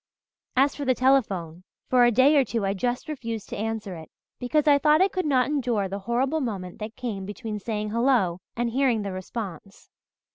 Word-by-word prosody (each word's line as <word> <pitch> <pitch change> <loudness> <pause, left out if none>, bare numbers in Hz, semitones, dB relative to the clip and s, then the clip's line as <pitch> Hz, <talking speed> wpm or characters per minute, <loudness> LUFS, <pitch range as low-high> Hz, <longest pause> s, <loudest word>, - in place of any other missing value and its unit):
As 275 +2 +3
for 290 - -5
the 255 -2 +2
telephone, 195 -11 +1 0.2
for 250 -1 +5
a 240 - +4
day 260 +6 +5
or 280 - +5
two 230 -5 -2
I 195 - 0
just 245 +8 -2
refused 230 -8 -5
to - - -5
answer 220 -2 -3
it, 160 -1 -10 0.3
because 300 +5 +1
I 285 -1 +6
thought 300 +2 +4
I 380 - +5
could 370 -4 -2
not 255 -3 +3
endure 245 -8 0
the 195 +1 -5
horrible 265 +6 +1
moment 190 -8 -5
that 215 +1 -6
came 220 -6 -4
between 210 +2 -5
saying 210 0 -3
'Hello' 230 -7 +2 0.2
and 235 0 -1
hearing 250 -4 +1
the 200 - -4
response. 190 -1 -7
235 Hz, 195 wpm, -25 LUFS, 200-265 Hz, 0.3 s, I